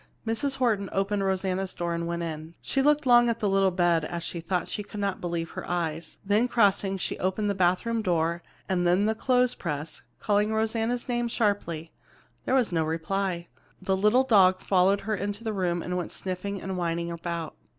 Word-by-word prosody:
Mrs. 230 Hz, +5 st, 0 dB
Horton 220 Hz, -7 st, +1 dB
opened 195 Hz, +1 st, 0 dB
Rosanna's 190 Hz, 0 st, -1 dB
door 170 Hz, -1 st, -2 dB
and 170 Hz, 0 st, -2 dB
went 170 Hz, 0 st, -2 dB
in. 160 Hz, 0 st, -6 dB
She 270 Hz, -, 0 dB
looked 295 Hz, +1 st, +3 dB
long 240 Hz, -1 st, +6 dB
at 230 Hz, -, 0 dB
the 210 Hz, -, 0 dB
little 195 Hz, 0 st, +3 dB
bed 175 Hz, -3 st, +2 dB
as 170 Hz, +1 st, -4 dB, 0.2 s
though 180 Hz, -3 st, +1 dB
she -, -, -4 dB
could 205 Hz, 0 st, -8 dB
not 200 Hz, -2 st, -2 dB
believe 170 Hz, -2 st, -3 dB
her -, -, -6 dB
eyes. 165 Hz, -2 st, -3 dB
Then 210 Hz, +5 st, +3 dB
crossing, 200 Hz, -4 st, +2 dB
she -, -, -3 dB
opened 200 Hz, +3 st, 0 dB
the -, -, 0 dB
bathroom 190 Hz, +5 st, +1 dB
door, 170 Hz, -3 st, 0 dB, 0.3 s
and 180 Hz, -2 st, +1 dB
then 180 Hz, +4 st, +3 dB
the 220 Hz, -, +2 dB
clothespress, 205 Hz, -, 0 dB, 0.2 s
calling 210 Hz, 0 st, +1 dB
Rosanna's 225 Hz, +2 st, -1 dB
name 240 Hz, -1 st, 0 dB
sharply. 200 Hz, -8 st, -1 dB, 0.5 s
There 260 Hz, -, +2 dB
was 250 Hz, -6 st, +2 dB
no 165 Hz, -2 st, +1 dB
reply. 170 Hz, +2 st, -2 dB, 0.3 s
The 190 Hz, 0 st, 0 dB
little 210 Hz, +7 st, +4 dB
dog 190 Hz, -7 st, +5 dB
followed 195 Hz, +1 st, +3 dB
her 215 Hz, +2 st, -2 dB
into 205 Hz, +2 st, -4 dB
the 220 Hz, -1 st, -2 dB
room 175 Hz, -3 st, -1 dB
and 180 Hz, -, -3 dB
went 180 Hz, -2 st, -3 dB
sniffing 190 Hz, +2 st, -4 dB
and 190 Hz, 0 st, -4 dB
whining 170 Hz, 0 st, -1 dB
about. 170 Hz, -1 st, -4 dB
190 Hz, 190 wpm, -27 LUFS, 170-215 Hz, 0.5 s, long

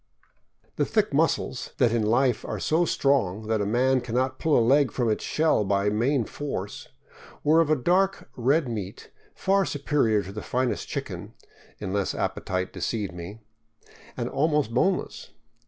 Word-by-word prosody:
The -, -, +2 dB
thick 215 Hz, -7 st, 0 dB
muscles, 145 Hz, -4 st, 0 dB
that 120 Hz, -3 st, +3 dB
in 115 Hz, -1 st, +1 dB
life 120 Hz, +2 st, +2 dB
are -, -, -4 dB
so 165 Hz, +3 st, +2 dB
strong 110 Hz, -, +1 dB
that 110 Hz, -1 st, 0 dB
a 100 Hz, -, -1 dB
man 130 Hz, +4 st, +2 dB
can 120 Hz, -1 st, -5 dB
not 130 Hz, +1 st, 0 dB
pull 160 Hz, -2 st, +3 dB
a 115 Hz, -, +3 dB
leg 140 Hz, +1 st, +4 dB
from 120 Hz, -3 st, 0 dB
its 105 Hz, -, -2 dB
shell 155 Hz, -8 st, +2 dB
by 100 Hz, +1 st, +1 dB
main 120 Hz, +3 st, +1 dB
force, 105 Hz, -9 st, -5 dB, 0.6 s
were 160 Hz, +2 st, +5 dB
of 160 Hz, -, 0 dB
a 155 Hz, -, +4 dB
dark 185 Hz, +7 st, +1 dB
red 135 Hz, +5 st, +2 dB
meat 105 Hz, -5 st, -6 dB, 0.2 s
far 195 Hz, +1 st, +2 dB
superior 140 Hz, -, +1 dB
to 95 Hz, -, -8 dB
the 105 Hz, +2 st, -6 dB
finest 125 Hz, 0 st, -1 dB
chicken -, -, -6 dB, 0.2 s
— -, -, -27 dB
unless 100 Hz, -1 st, -2 dB
appetite 95 Hz, 0 st, -2 dB
deceived 105 Hz, -6 st, -3 dB
me 90 Hz, +6 st, -8 dB, 0.4 s
— -, -, -23 dB
and -, -, -2 dB
almost 150 Hz, -5 st, 0 dB
boneless. 185 Hz, +9 st, -1 dB
125 Hz, 170 wpm, -26 LUFS, 105-150 Hz, 0.6 s, were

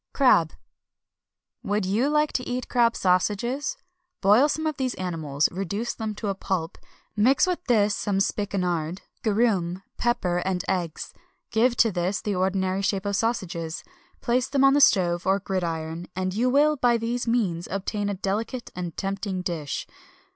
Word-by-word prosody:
CRAB. 175 Hz, -, +4 dB, 1.1 s
Would 205 Hz, 0 st, 0 dB
you 220 Hz, +9 st, +1 dB
like 300 Hz, 0 st, +2 dB
to 255 Hz, -, -1 dB
eat 250 Hz, 0 st, -3 dB
crab 235 Hz, -1 st, +3 dB
sausages? 215 Hz, +9 st, 0 dB, 0.4 s
Boil 215 Hz, +9 st, +5 dB
some 315 Hz, +2 st, -2 dB
of 310 Hz, -3 st, -1 dB
these 260 Hz, -3 st, -1 dB
animals; 160 Hz, -6 st, -1 dB
reduce 195 Hz, +5 st, -3 dB
them 220 Hz, -2 st, -4 dB
to 210 Hz, 0 st, -3 dB
a -, -, +1 dB
pulp; 190 Hz, -3 st, -3 dB, 0.4 s
mix 250 Hz, -, +4 dB
with 360 Hz, -1 st, -2 dB
this 210 Hz, -5 st, +3 dB
some 200 Hz, -2 st, -1 dB
spikenard, 185 Hz, -4 st, -1 dB, 0.2 s
garum, 200 Hz, -5 st, +1 dB
pepper, 215 Hz, -8 st, 0 dB
and 180 Hz, 0 st, -2 dB
eggs; 175 Hz, -4 st, -3 dB, 0.4 s
give 235 Hz, +2 st, +2 dB
to 225 Hz, -, +4 dB
this 185 Hz, +2 st, -1 dB
the 210 Hz, -, -2 dB
ordinary 190 Hz, 0 st, 0 dB
shape 195 Hz, 0 st, -1 dB
of 200 Hz, 0 st, 0 dB
sausages, 180 Hz, -8 st, -2 dB, 0.4 s
place 250 Hz, +1 st, +1 dB
them 275 Hz, -1 st, +2 dB
on 275 Hz, 0 st, +6 dB
the 290 Hz, -, +4 dB
stove 175 Hz, -7 st, +4 dB
or 190 Hz, +1 st, +4 dB
gridiron, 170 Hz, -3 st, -3 dB
and 185 Hz, 0 st, -2 dB
you 240 Hz, +5 st, +1 dB
will, 295 Hz, +3 st, +4 dB
by 240 Hz, -2 st, +3 dB
these 235 Hz, +2 st, -2 dB
means, 195 Hz, -8 st, 0 dB
obtain 200 Hz, +1 st, -2 dB
a 200 Hz, -, -2 dB
delicate 215 Hz, +6 st, -3 dB
and 175 Hz, -2 st, -5 dB
tempting 195 Hz, -1 st, -3 dB
dish. 160 Hz, -5 st, -3 dB
200 Hz, 160 wpm, -25 LUFS, 180-240 Hz, 1.1 s, on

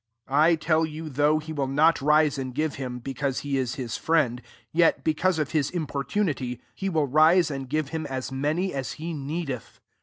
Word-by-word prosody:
' 115 Hz, +1 st, -54 dB
8 135 Hz, -, -10 dB
I 155 Hz, +4 st, +5 dB
tell 160 Hz, 0 st, +1 dB
you, 160 Hz, 0 st, -4 dB
thougt^ 150 Hz, +3 st, +2 dB
he 160 Hz, 0 st, -6 dB
will 140 Hz, -3 st, -1 dB
not 150 Hz, +4 st, +3 dB
rise 150 Hz, 0 st, +3 dB
and 130 Hz, -2 st, -5 dB
give 155 Hz, 0 st, -1 dB
hiniai. 125 Hz, -2 st, -5 dB
because 135 Hz, 0 st, -2 dB
he 140 Hz, -1 st, -2 dB
is 125 Hz, 0 st, -2 dB
his 125 Hz, -6 st, -4 dB
friend, 140 Hz, -7 st, +1 dB, 0.3 s
jet 170 Hz, 0 st, +3 dB
be^ 155 Hz, -, +2 dB
cause 185 Hz, +2 st, +1 dB
of 155 Hz, -2 st, -1 dB
his 150 Hz, -4 st, +1 dB
importunity, 145 Hz, -, -2 dB
he 195 Hz, -, -3 dB
will 160 Hz, -5 st, +1 dB
rise 155 Hz, +4 st, +4 dB
and 135 Hz, -2 st, -5 dB
give 155 Hz, 0 st, -1 dB
him 160 Hz, 0 st, -4 dB
as 130 Hz, -1 st, -4 dB
ta%t^p, 150 Hz, +8 st, -1 dB
as 135 Hz, -2 st, -4 dB
he 165 Hz, +2 st, -5 dB
needeth. 140 Hz, -4 st, -5 dB
150 Hz, 210 wpm, -26 LUFS, 135-160 Hz, 0.3 s, I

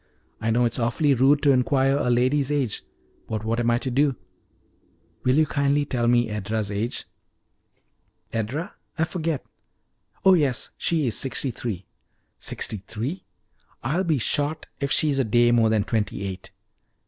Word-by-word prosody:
I 115 Hz, -, -1 dB
know 120 Hz, +2 st, +3 dB
it 115 Hz, -, 0 dB
is -, -, 0 dB
awfully 130 Hz, +5 st, +2 dB
rude 135 Hz, +3 st, +4 dB
to 145 Hz, -, +6 dB
inquire 135 Hz, +1 st, +3 dB
a 140 Hz, -3 st, 0 dB
lady's 130 Hz, +4 st, +2 dB
age, 135 Hz, -7 st, 0 dB, 0.5 s
but 110 Hz, -1 st, -3 dB
what 115 Hz, +1 st, 0 dB
am 120 Hz, 0 st, +1 dB
I 120 Hz, -, +3 dB
to 130 Hz, +1 st, -3 dB
do? 140 Hz, +1 st, +2 dB, 1.1 s
Will 125 Hz, +1 st, +3 dB
you 155 Hz, +1 st, +4 dB
kindly 140 Hz, 0 st, +1 dB
tell 120 Hz, -3 st, -1 dB
me 120 Hz, 0 st, +3 dB
Edra's 105 Hz, 0 st, -2 dB
age?" 105 Hz, +4 st, -2 dB, 1.3 s
"Edra? 120 Hz, +10 st, -3 dB, 0.2 s
I 160 Hz, -, +2 dB
forget. 160 Hz, -3 st, -2 dB, 0.8 s
Oh 190 Hz, -, +8 dB
yes; 145 Hz, -8 st, +1 dB
she 160 Hz, -4 st, +1 dB
is 120 Hz, -, 0 dB
sixty 135 Hz, 0 st, 0 dB
three." 105 Hz, -5 st, -5 dB, 0.5 s
"Sixty 110 Hz, -, -3 dB
three! 115 Hz, -, -5 dB, 0.6 s
I'll 155 Hz, +10 st, 0 dB
be 160 Hz, -5 st, +1 dB
shot 145 Hz, +6 st, 0 dB
if 140 Hz, 0 st, -2 dB
she's 145 Hz, -3 st, +2 dB
a -, -, +3 dB
day 120 Hz, +1 st, +3 dB
more 115 Hz, -2 st, +4 dB
than 110 Hz, -2 st, +2 dB
twenty 105 Hz, -2 st, -2 dB
eight! 95 Hz, -1 st, -6 dB
125 Hz, 160 wpm, -24 LUFS, 115-145 Hz, 1.3 s, Oh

